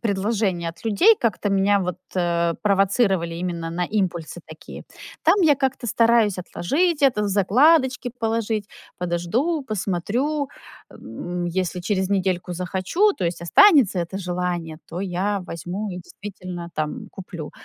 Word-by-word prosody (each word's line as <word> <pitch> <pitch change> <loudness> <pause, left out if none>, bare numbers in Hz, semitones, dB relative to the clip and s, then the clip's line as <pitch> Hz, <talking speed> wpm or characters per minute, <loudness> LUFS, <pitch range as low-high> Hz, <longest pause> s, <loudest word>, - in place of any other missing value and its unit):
предложения 200 -4 -1
от 165 +4 -11
людей 355 - +5
как-то 210 -3 0
меня, 195 +1 +3
вот, 180 -2 -3 0.7
провоцировали 195 -3 +2
именно 170 -1 -4
на 175 +2 -1
импульсы 175 -4 -2
такие. 155 0 -11 0.4
Там - - +5
я 300 -3 +6
как-то 265 -2 -2
стараюсь 230 -4 +3
отложить 295 - 0
это, 255 -6 +3
в 205 - 0
закладочки 250 - +3
положить, 225 -2 -1 0.3
подожду, 180 - -1
посмотрю, 240 - -2 0.4
м, 175 0 -6
если 180 +1 -2
через 190 0 -1
недельку 185 -2 0
захочу, 190 - +1
то 185 - -4
есть 170 0 -2
останется 265 - +5
это 175 +3 -3
желание, 175 -3 -3
то 175 - -5
я 195 +2 -1
возьму 180 +6 -5
и 180 - -6
действительно 180 -1 -8
там 155 +9 -4
куплю. 175 -5 -8
195 Hz, 135 wpm, -23 LUFS, 175-230 Hz, 0.7 s, я